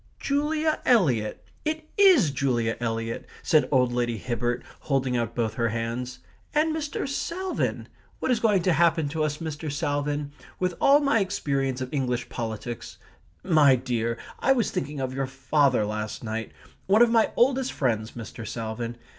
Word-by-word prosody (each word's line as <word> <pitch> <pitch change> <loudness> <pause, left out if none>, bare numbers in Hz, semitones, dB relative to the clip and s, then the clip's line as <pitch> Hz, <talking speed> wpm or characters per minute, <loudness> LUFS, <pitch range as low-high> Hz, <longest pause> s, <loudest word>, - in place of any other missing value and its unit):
"Julia 305 +2 0
Eliot. 135 - +2 0.2
It 310 0 -3
IS 360 - +6
Julia 120 -5 0
Eliot!" 115 -1 -3 0.2
said 155 - +3
old 125 -3 +3
Lady 120 -1 0
Hibbert, 120 +1 -2 0.2
holding 135 -3 0
out 115 -1 -1
both 115 -3 0
her 115 0 0
hands. 115 +3 -4 0.3
"And 310 +1 +2
Mr. 300 -3 -3
Salvin. 350 +6 -2 0.3
What - - -1
is 240 - +2
going 205 -6 +3
to 180 - +3
happen 165 -1 +3
to 155 +1 -1
us, 150 -1 -1
Mr. 155 -2 -5
Salvin? 145 -1 -2 0.3
With 180 -1 0
all 285 +2 +6
my 275 -5 +3
experience 140 -9 -1
of 130 +2 -5
English 125 -3 -1
politics 115 0 -5 0.5
My 155 -7 +5
dear, 120 -2 -2 0.2
I 270 - +4
was 240 -5 0
thinking 145 +1 -3
of 130 -1 -2
your 135 0 -2
father 135 -3 +2
last 105 +2 -4
night 110 0 -4 0.4
one 210 +5 +6
of 235 - +3
my 225 -2 +4
oldest 265 +1 +2
friends, 110 -5 -1
Mr. 115 -1 -8
Salvin. 115 +1 -4
135 Hz, 160 wpm, -26 LUFS, 120-200 Hz, 0.5 s, IS